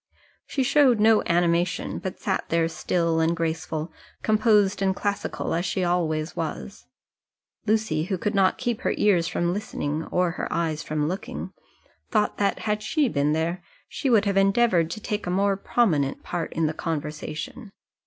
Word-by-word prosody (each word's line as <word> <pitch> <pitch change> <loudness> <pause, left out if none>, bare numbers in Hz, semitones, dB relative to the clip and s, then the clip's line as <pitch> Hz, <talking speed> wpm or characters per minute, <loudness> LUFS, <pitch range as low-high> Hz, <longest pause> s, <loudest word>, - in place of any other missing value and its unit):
She 270 - 0
showed 265 -3 +4
no 220 0 +5
animation, 170 0 +1
but 190 - -6
sat 190 -2 -2
there 165 0 +2
still 165 0 0
and 165 +1 +2
graceful, 160 -1 -3 0.3
composed 210 -3 +3
and 190 -1 +2
classical, 205 0 -2
as 170 - 0
she 190 0 -1
always 165 -3 0
was. 150 - -5 0.8
Lucy, 210 -8 +1
who 190 0 -2
could 210 +4 -2
not 195 -2 +3
keep 240 -4 -2
her - - 0
ears 180 -5 +3
from 175 +1 0
listening 160 -6 -3
or 180 -1 +1
her - - -4
eyes 160 -2 -1
from 150 -2 -1
looking, 185 +5 -5 0.6
thought 210 -1 +1
that 200 -1 +1
had 210 0 -1
she 290 +4 +1
been 145 -2 +1
there 165 +3 -1 0.3
she 275 - -2
would 220 -4 +4
have 200 -1 +1
endeavoured 195 -4 +3
to 195 - -5
take 210 -2 -3
a - - -1
more 195 +2 +2
prominent 170 - +1
part 170 -2 -3
in 165 - +1
the 155 - 0
conversation. 155 - -5
180 Hz, 165 wpm, -25 LUFS, 165-210 Hz, 0.8 s, no